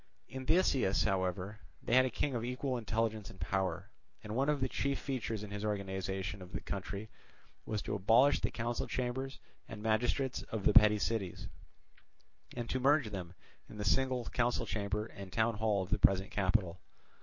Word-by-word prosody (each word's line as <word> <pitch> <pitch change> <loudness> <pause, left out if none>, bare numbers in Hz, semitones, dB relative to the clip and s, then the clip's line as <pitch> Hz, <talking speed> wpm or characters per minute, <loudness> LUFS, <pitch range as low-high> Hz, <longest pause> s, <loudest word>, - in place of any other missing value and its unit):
In 130 0 -7
Theseus, 135 - +3
however, 95 +2 -1 0.2
they - - -2
had 130 +1 +7
a - - 0
king 135 +3 -1
of 115 -2 -2
equal 125 +2 -2
intelligence 110 -2 -1
and 95 - -13
power; 95 +2 -2 0.3
and 105 +1 -5
one 135 +3 +2
of 150 -1 +2
the 130 - +1
chief 140 +1 -1
features 115 -5 -3
in 105 - -8
his 105 0 -4
organization 95 -1 -3
of 90 +1 -11
the - - -2
country 100 +2 -5 0.6
was 105 -2 -2
to - - -3
abolish 115 +8 +5
the - - 0
council 120 +1 -2
chambers 130 +2 -2 0.3
and 105 -1 -8
magistrates 120 +4 +1
of 110 -3 -3
the - - +5
petty 105 0 +8
cities, 95 -1 -2 1.1
and 120 -1 -3
to 130 - 0
merge 135 -3 +3
them 90 -3 -6 0.3
in - - -10
the 105 - -3
single 130 +2 +2
council 120 0 0
chamber 105 0 -2
and 100 -4 -10
town 110 0 +1
hall 105 -3 +1
of 90 - -10
the - - +2
present 95 +1 +3
capital. 95 -2 0
110 Hz, 180 wpm, -34 LUFS, 100-125 Hz, 1.1 s, petty